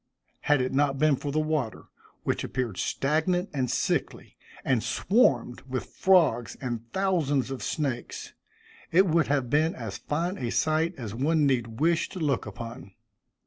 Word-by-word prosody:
Had 145 -2 +2
it 130 - -2
not 140 0 +2
been 150 0 +4
for 145 +2 -4
the 150 - -2
water, 155 -6 -1 0.4
which - - -1
appeared 120 -7 -3
stagnant 160 +6 0
and 130 -4 -1
sickly, 130 - -1 0.3
and 130 -4 +2
swarmed 125 - +2
with 130 -6 -3
frogs 160 - +3
and 120 -3 -5
thousands 155 -9 +1
of 135 - -5
snakes, 130 -6 -3 0.6
it 185 +4 +5
would 165 -2 +2
have 135 -4 0
been 155 +3 +2
as 110 -6 -6
fine 170 +6 -2
a 120 -3 -2
sight 160 +6 +1
as 110 -6 -6
one 150 +5 +2
need 120 -5 0
wish 165 +2 +2
to 185 - -7
look 140 -8 0
upon. 105 -3 -8
140 Hz, 155 wpm, -27 LUFS, 120-160 Hz, 0.6 s, it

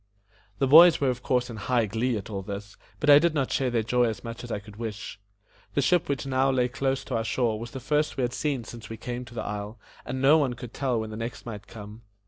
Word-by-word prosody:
The 135 - +2
boys 165 +5 +8
were 135 -2 +2
of 125 0 -6
course 125 -1 0
in 115 - -7
high 115 +2 +1
glee 115 +3 -1
at 100 - -7
all 100 -3 -4
this, 100 +1 -7 0.2
but 150 - -2
I 145 0 +9
did 165 0 +1
not 135 -3 0
share 130 -2 +1
their 115 -2 0
joy 120 +1 +2
so 110 - -8
much 115 0 -7
as 120 - -7
I - - -1
could 105 0 -12
wish. 110 -2 -6 0.6
The 140 - +3
ship 170 +5 +2
which 140 -3 -1
now 135 0 +2
lay 125 -2 +2
close 135 +2 -1
to 130 - -4
our 115 - 0
shore 115 -1 0
was 115 +1 -6
the 130 - -7
first 150 +4 0
we 130 - 0
had 120 0 -1
seen 140 -4 -1
since 115 -1 -10
we 115 - -6
came 125 +2 -5
to 120 0 -13
the - - -3
isle, 105 +2 -5 0.3
and 130 - -4
no 140 +4 +6
one 130 -4 0
could 120 -1 -9
tell 130 -4 0
when 110 0 -5
the 110 - -6
next 115 +1 -6
might 105 -4 -7
come. 105 0 -10
120 Hz, 270 wpm, -27 LUFS, 110-135 Hz, 0.6 s, I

